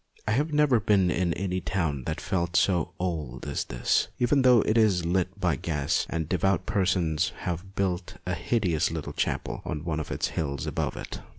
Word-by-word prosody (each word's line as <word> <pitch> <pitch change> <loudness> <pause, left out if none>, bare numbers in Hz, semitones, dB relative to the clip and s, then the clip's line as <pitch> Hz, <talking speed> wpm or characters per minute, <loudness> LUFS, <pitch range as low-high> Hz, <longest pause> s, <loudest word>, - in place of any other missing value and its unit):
I - - +2
have 145 +8 +1
never 150 -5 +4
been 95 -3 +3
in 90 -1 +1
any 95 -1 -2
town 80 -8 -1
that - - -2
felt 85 -2 -2
so 90 -5 +2
old 75 -9 -3
as 70 -2 -2
this, 60 0 +1
even 125 +3 +3
though 125 -3 +6
it 110 - +1
is 100 -7 +3
lit 90 +3 0
by 90 -6 +2
gas 75 0 -1
and 80 -2 -2
devout 95 +2 +1
persons 90 -6 +1
have 90 +2 -4
built 90 -2 -1
a 90 - -1
hideous 90 -2 +1
little 80 -3 -5
chapel - - -2
on 75 0 -4
one 80 -2 -1
of 75 - -4
the - - -2
hills 70 -3 -2
above - - -2
it. - - -6
90 Hz, 190 wpm, -27 LUFS, 80-100 Hz, -, though